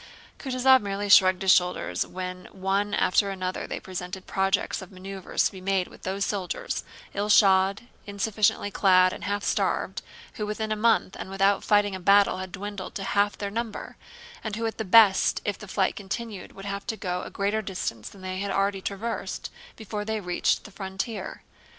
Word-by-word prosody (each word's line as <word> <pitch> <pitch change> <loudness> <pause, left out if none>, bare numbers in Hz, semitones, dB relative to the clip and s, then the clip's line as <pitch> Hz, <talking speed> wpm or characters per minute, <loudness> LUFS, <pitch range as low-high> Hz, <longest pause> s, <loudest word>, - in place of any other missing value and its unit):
Kutúzov 260 -1 +4
merely 200 0 -3
shrugged 185 -1 +6
his 190 - +5
shoulders 180 0 +2
when 180 0 -6
one 195 +2 -1
after 200 +2 +3
another 185 -1 -3
they - - -4
presented 185 0 -6
projects 195 +1 0
of 190 - -11
maneuvers 190 0 -2
to - - +1
be 190 - -10
made 190 -1 0
with - - -16
those 195 +1 -2
soldiers—ill 205 - -4
shod, 195 -1 +5 0.3
insufficiently 205 +1 0
clad, 185 -2 +4
and - - -7
half 205 +1 -1
starved—who 470 - -2
within 215 +1 -3
a - - +2
month 215 -3 +2
and - - -6
without 195 +1 +2
fighting 205 -1 +3
a 190 - -4
battle 200 +1 +4
had 185 -1 -6
dwindled 200 0 -6
to 195 - -3
half 205 0 +1
their 200 -1 -4
number, 230 0 -4 0.5
and 220 -2 -3
who 230 +1 -2
at 225 - -3
the - - 0
best 205 -1 +5
if 205 -2 -2
the 210 - -10
flight 195 0 0
continued 205 0 -6
would 195 - -10
have 200 0 -5
to 220 - -2
go 180 -3 -3
a - - -7
greater 205 +2 -1
distance 180 - -4
than 195 - -15
they 185 0 -4
had 200 +1 -2
already 195 0 0
traversed, 210 +5 -4 0.2
before 210 -1 -5
they 220 +1 -2
reached 180 -3 0
the 205 - -12
frontier. 195 +3 -5
200 Hz, 180 wpm, -26 LUFS, 190-210 Hz, 0.5 s, shrugged